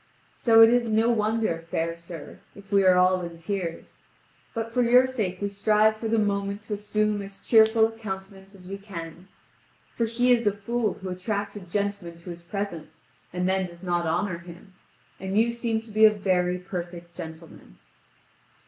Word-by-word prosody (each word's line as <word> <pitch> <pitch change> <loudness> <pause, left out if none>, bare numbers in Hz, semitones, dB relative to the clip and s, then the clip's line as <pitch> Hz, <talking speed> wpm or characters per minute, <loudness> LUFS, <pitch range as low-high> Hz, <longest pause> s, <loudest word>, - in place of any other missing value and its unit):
So 225 -2 +5
it 225 - +7
is 240 -1 +2
no 220 +2 +3
wonder, 215 -6 0
fair 165 +1 -1
sir, 170 -2 -10 0.2
if 200 0 -15
we 200 -1 +4
are 185 -1 +6
all 185 0 +4
in 170 -1 -7
tears. 175 -1 -5 0.6
But 230 0 -3
for 250 - +2
your 245 +2 +6
sake 215 -8 -3
we 205 - -1
strive 210 +2 +3
for 225 - -4
the 225 +1 +1
moment 200 -1 -1
to 220 - -5
assume 210 0 0
as 195 0 -9
cheerful 220 0 +5
a 225 - -2
countenance 195 -2 -8
as 180 -2 -14
we 195 +1 -6
can. 175 -3 -9 0.7
For 230 - 0
he 245 +2 +2
is 235 -3 +3
a 205 0 +1
fool 225 0 -1
who 190 - -8
attracts 200 +2 -3
a - - -5
gentleman 200 -2 -3
to 170 +1 -9
his 170 0 -9
presence 175 -2 -6 0.3
and 180 0 -1
then 190 0 +1
does 170 +1 -14
not 175 -2 0
honour 170 +2 -1
him; 175 +2 -13 0.5
and 190 +1 -3
you 230 +2 +4
seem 235 -2 -2
to 225 - -14
be 215 +1 +6
a - - +9
very 185 -3 0
perfect 175 -1 -7
gentleman. 160 - -10
200 Hz, 185 wpm, -26 LUFS, 180-220 Hz, 0.7 s, a